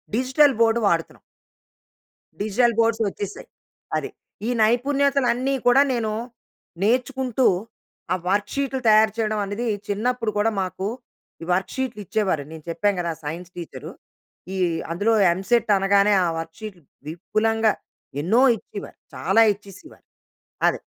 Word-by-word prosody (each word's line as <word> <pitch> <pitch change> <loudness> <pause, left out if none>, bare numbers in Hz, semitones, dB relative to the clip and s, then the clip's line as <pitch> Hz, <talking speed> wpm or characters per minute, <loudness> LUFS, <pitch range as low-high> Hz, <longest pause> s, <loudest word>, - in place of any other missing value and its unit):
Digital 265 +4 +4
board 230 0 +4
వాడుతున్నాం. 165 -3 -1 1.2
Digital 225 +3 +2
boards 225 0 +2
వచ్చేసాయి. 200 0 -6 0.5
అది. - - -4 0.4
ఈ - - 0
నైపుణ్యతలు 275 +4 +2
అన్నీ 260 +3 -1
కూడా 250 +3 +6
నేను 225 -3 -1 0.7
నేర్చుకుంటూ 255 +2 +1 0.7
ఆ - - +2
వర్క్ 205 +1 0
షీట్‌లు 275 -1 -1
తయారు 215 0 +5
చేయడం 215 -1 0
అనేది 205 +5 -3 0.2
చిన్నప్పుడు 230 +2 -1
కూడా 220 +2 +2
మాకు 190 +1 -3 0.5
ఈ - - -6
వర్క్ 185 +1 -1
షీట్‌లు 255 -5 -3
ఇచ్చేవారు 190 -7 0
నేను 160 -1 -10
చెప్పాను 200 +3 0
కదా 170 -1 -2
సైన్స్ 170 +4 -6
టీచర్. 170 -2 -8 0.7
ఈ - - -3 0.3
అందులో 205 +7 +1 0.2
ఎంసెట్ 210 +5 +1
అనగానే 200 +1 +3
ఆ - - +1
వర్క్ 165 0 -8
షీట్ 210 -5 -8 0.3
విపులంగా 215 +6 +1 0.5
ఎన్నో 215 +11 +3 0.2
ఇచ్చేవారు 220 - -10 0.2
చాలా 225 - +3
ఇచ్చేసేవారు. 200 - -15 0.6
అదే. - - -4
215 Hz, 125 wpm, -23 LUFS, 195-245 Hz, 1.2 s, కూడా